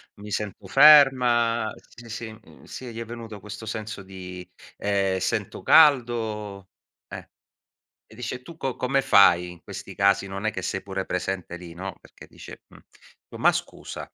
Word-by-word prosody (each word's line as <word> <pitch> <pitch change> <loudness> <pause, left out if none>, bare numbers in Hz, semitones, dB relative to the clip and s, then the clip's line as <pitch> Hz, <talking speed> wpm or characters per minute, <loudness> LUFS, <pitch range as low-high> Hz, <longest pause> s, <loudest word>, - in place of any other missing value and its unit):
mi 105 +1 -11
sento 100 -1 -4
ferma". 125 -5 +5
Sì, 115 0 -16
sì, 115 0 -6
mhmm, 110 0 -17
sì, 125 -2 -8
gli 115 - -7
è 115 - -5
venuto 115 -2 -9
questo 105 +3 -9
senso 110 -2 -6
di 90 -1 -9 0.3
ehm, 100 -2 0
"sento - - -3
caldo." 110 -9 +3 0.4
Eh. - - -9 0.8
E - - -18
dice, 125 +2 -6
tu 165 +4 -12
co 135 -4 -3
come 135 +2 +1
fai 90 -7 +5
in 85 -2 -17
questi - - -9
casi, 100 0 +2
non 95 +2 -6
è 110 - +1
che 95 - -5
sei 95 +1 -3
pure 95 -1 -5
presente 90 -1 -3
lì, 90 -1 -10
no, 95 +3 -7
perché - - -16
dice, - - -13
mhmm, - - -17 0.5
dico: - - -10
"Ma - - +4
scusa" - - -6
105 Hz, 170 wpm, -25 LUFS, 95-120 Hz, 0.8 s, ferma